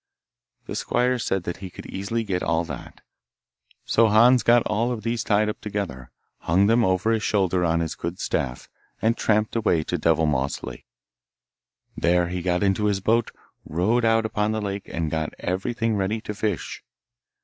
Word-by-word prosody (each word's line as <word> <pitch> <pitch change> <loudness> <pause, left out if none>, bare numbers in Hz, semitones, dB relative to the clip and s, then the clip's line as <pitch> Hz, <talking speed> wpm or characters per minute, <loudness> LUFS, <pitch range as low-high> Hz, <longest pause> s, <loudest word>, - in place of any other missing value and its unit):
The - - -6
squire 125 +1 +1
said 95 -5 -1
that 90 - -4
he 95 -1 -8
could - - -11
easily 105 +4 -3
get 95 -4 -2
all 80 +1 +1
that, - - -9 0.8
so 115 0 +4
Hans 120 +4 +6
got 120 0 +4
all 115 +4 0
of 115 -4 -4
these 115 +1 -1
tied 105 0 +2
up 105 - -4
together, 100 - -4 0.3
hung 90 +5 +2
them 115 +3 +4
over 95 +2 +2
his 110 -1 +1
shoulder 95 -4 +1
on 85 -1 +2
his 80 - -2
good 85 +2 -5
staff, 65 -2 -2 0.3
and 115 +2 +2
tramped 105 +1 +1
away 95 -8 +2
to 90 +2 -3
Devilmoss 75 -4 +1
Lake. 65 -1 -8 1.1
There 90 0 +2
he 90 0 -3
got 90 +1 0
into 100 +1 +2
the 100 - -1
boat, 115 +4 +1 0.3
rowed 105 +10 +1
out 115 0 +3
upon 105 0 0
the 110 - -1
lake, 100 -1 -4
and 80 -2 -2
got 80 -1 -2
everything 110 +5 -1
ready 100 +3 -1
to 105 - -5
fish. 105 +1 -3
100 Hz, 175 wpm, -24 LUFS, 85-110 Hz, 1.1 s, Hans